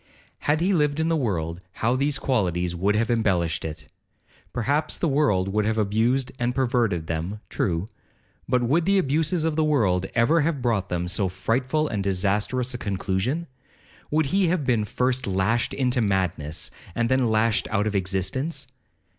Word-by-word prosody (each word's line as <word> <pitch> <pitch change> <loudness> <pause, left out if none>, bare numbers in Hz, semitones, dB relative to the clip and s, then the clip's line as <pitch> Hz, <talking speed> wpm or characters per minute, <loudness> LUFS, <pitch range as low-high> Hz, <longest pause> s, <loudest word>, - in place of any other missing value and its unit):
Had 150 +2 +1
he 190 +3 +2
lived 150 -3 +1
in 160 +1 +1
the 165 - +2
world, 90 - -2
how 120 +3 0
these 140 +1 +1
qualities 90 -10 0
would 100 +4 +1
have 115 +2 +1
embellished 95 -8 +1
it! 75 -1 -6 0.7
Perhaps 140 +6 -1
the 170 - 0
world 135 -11 +2
would 105 +2 +1
have 110 +1 0
abused 115 +5 +1
and 120 +1 0
perverted 120 -10 +1
them—true; 85 +1 -2 0.6
but 125 -1 +2
would 155 +8 +2
the 195 +1 +3
abuses 160 +1 +1
of 160 -2 0
the 160 - +2
world 100 -12 +2
ever 145 +8 +4
have 150 -1 0
brought 110 -7 0
them 90 -1 -1
to - - -4
so 100 -4 0
frightful 125 +10 0
and 105 -6 -2
disastrous 105 +7 0
a 120 - -5
conclusion?—would 130 - -3
he 190 +6 +2
have 165 -4 0
been 115 -5 +2
first 125 +2 -1
lashed 100 +5 +1
into 125 -2 +1
madness, 90 -7 -1 0.2
and 115 0 +1
then 130 -1 +2
lashed 110 0 +2
out 105 -1 +1
of 105 -1 -1
existence? 100 - -2
115 Hz, 165 wpm, -24 LUFS, 95-140 Hz, 0.7 s, ever